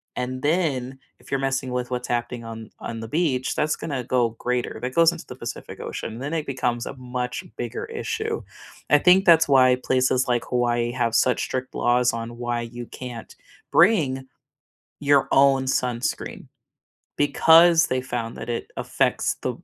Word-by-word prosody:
and 130 +1 -3
then 140 -5 0 0.2
if - - -18
you're 135 - +1
messing 135 -1 -1
with 125 0 -2
what's 125 0 -3
happening 120 0 -2
on 115 -1 -8
on 115 - -6
the 115 - -6
beach, 135 -2 0
that's 155 0 +1
gonna 135 -5 -4
go 120 -1 +1
greater, 125 0 -2
that 125 +1 -3
goes 165 0 +6
into 170 -1 -9
the 125 - -8
Pacific 120 -2 -7
Ocean, 115 +1 -6
then 140 +4 -4
it 155 -2 -2
becomes 125 -3 -2
a - - -6
much 125 -1 -4
bigger 120 0 -4
issue. 450 0 -3 0.5
I 145 - +6
think 185 +4 +5
that's 165 -2 +6
why 130 -2 +5
places 130 0 +2
like 120 -1 0
Hawaii 120 -1 0
have 120 -2 -1
such 125 - +3
strict 130 0 -4
laws 125 0 +2
on 115 0 -6
why 120 0 -2
you 120 +1 -7
can't 120 -3 -9 0.4
bring 135 -11 +3 0.8
your 140 -1 +3
own 135 -1 +4
sunscreen, 125 -2 -2 0.7
because 165 +3 +6
they 130 - 0
found 120 -3 -4
that - - -7
it 120 - -4
affects - - 0
the - - 0
w - - -14
125 Hz, 170 wpm, -24 LUFS, 120-145 Hz, 0.8 s, goes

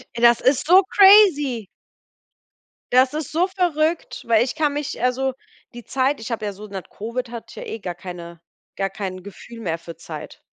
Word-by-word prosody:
Das 235 0 +4
ist 260 +2 +2
so 370 +3 +7
crazy. 350 - +6 1.3
Das 255 +2 +4
ist 305 -2 -4
so 345 +4 +2
verrückt, 340 -3 -1
weil 230 -1 +4
ich 250 - -4
kann 300 -2 +1
mich 295 -1 -4
also, 260 +1 0 0.4
die 240 -1 -10
Zeit 270 +1 0
ich 225 - -7
habe 225 -2 -3
ja 205 - -3
so 210 +2 -11
nach 195 -2 -7
Covid 235 +3 -5
hatte 235 -2 -9
ja - - -7
eh 225 - -6
gar 180 -4 -5
keine 170 -2 -9 0.4
gar 195 0 -1
kein 190 -2 -6
Gefühl 230 +4 -11
mehr 165 -6 -2
für 165 0 -10
Zeit. 155 -1 -10
240 Hz, 180 wpm, -22 LUFS, 200-295 Hz, 1.3 s, so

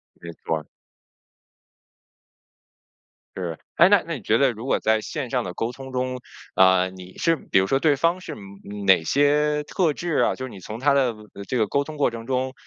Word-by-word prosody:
没 85 0 -10
错 80 - 0
儿。 75 -1 -7 2.7
是。 85 -4 -4 0.2
诶， 170 - +7
那 205 -2 +5
那 165 - -3
你 130 - -8
觉 110 +4 +2
得 135 -1 +3
如 115 +3 -8
果 - - +1
在 110 0 +2
线 130 +3 -5
上 125 -3 0
的 90 - -6
沟 115 +5 -2
通 130 +1 -10
中， 130 0 -2 0.4
啊， 95 0 +5
你 95 0 -12
是 165 -1 +2
比 95 - 0
如 95 - +1
说 135 - +2
对 150 +1 +3
方 170 +6 +1
是， - - -8
嗯， 100 0 -10
哪 95 -4 +5
些 150 - +2
特 165 +1 +1
质 165 +1 -3
啊， - - +3
就 130 - -6
是 130 - -6
你 100 - -10
从 110 +5 -8
他 145 +2 +3
的， 130 -4 +2 0.2
呃， 100 - -8
这 130 - -2
个 110 -3 +2
沟 140 +7 +1
通 155 +1 -8
过 145 -4 +2
程 115 0 -8
中 130 0 -1
125 Hz, 225 characters per minute, -23 LUFS, 100-145 Hz, 2.7 s, 诶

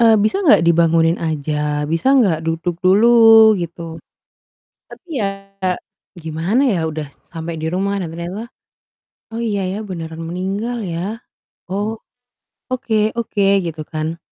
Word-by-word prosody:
eee, 225 -2 +6
bisa 385 - +1
gak 170 - +6
dibangunin 165 0 +3
aja? 150 -2 -1
Bisa 165 - +2
gak 185 -11 +3
duduk 165 +1 -2
dulu? 225 +3 +7
Gitu. 165 -1 -6 0.9
Tapi 360 - -14 0.2
ya - - +1 0.9
gimana 170 - -1
ya 170 -6 0
udah 155 -2 -4 0.2
sampai 165 0 -5
di 160 - -4
rumah 200 +2 -1
dan 175 -5 -4
ternyata, 190 +8 -6 0.8
"Oh 225 - -6
iya 210 -4 -1
ya 195 +3 -3
beneran 165 -4 -6
meninggal 195 +7 -3
ya, 190 +5 -4 0.4
oh, 205 +4 -3 0.7
oke 220 -4 0
oke," 215 -3 -1 0.2
gitu 160 -1 -5
kan. 155 +2 -4
180 Hz, 130 wpm, -19 LUFS, 165-220 Hz, 0.9 s, dulu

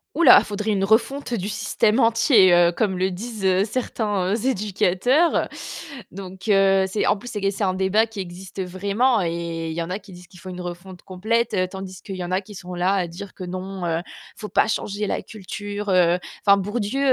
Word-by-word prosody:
Ouh 340 - +2
là, - - +9
faudrait 210 +1 -3
une 195 -2 0
refonte 235 +6 +1
du 200 -3 -2
système 215 +2 +1
entier, 230 - +5
heu, 175 0 +5
comme 190 -2 0
le 185 +1 0
disent, 215 +2 -6
heu, 190 0 +3
certains 205 -4 -1
heu, 225 +2 -2
éducateurs, 215 - +2 0.6
donc 190 +2 -8
heu, 195 -1 +4
c'est, 205 +2 -1
en - - +4
plus 245 +5 -9
c'est 210 - -3
que 195 - +2
c'est 200 +2 -3
un 185 -1 +1
débat 190 +4 +2
qui 220 -2 -9
existe 185 +1 -7
vraiment 200 +6 +1
et 165 -1 -3
il 160 - -4
y 170 - -3
en 165 - -4
a 185 +3 -3
qui 195 -1 -16
disent 180 0 -13
qu'il 180 0 -16
faut 185 - -8
une 180 0 -7
refonte 175 +1 -8
complète, 220 +6 -1
heu, 185 -2 +2
tandis 190 0 -8
qu'il 195 -3 -6
y 180 - -4
en 175 - -6
a 185 +1 +1
qui 205 +1 -13
sont 180 -1 -8
là, 180 +2 +1
à 185 -3 0
dire 185 +3 -9
que: - - -9
«Non, 185 0 -5
heu, 165 -1 0
il - - -17 0.3
faut 210 - -6
pas - - +3
changer 210 -1 -2
la - - -2
culture 205 0 -7
heu,» 180 -1 +4 0.3
enfin 200 -1 +6
Bourdieu, 205 +5 -2
195 Hz, 225 wpm, -23 LUFS, 185-215 Hz, 0.6 s, là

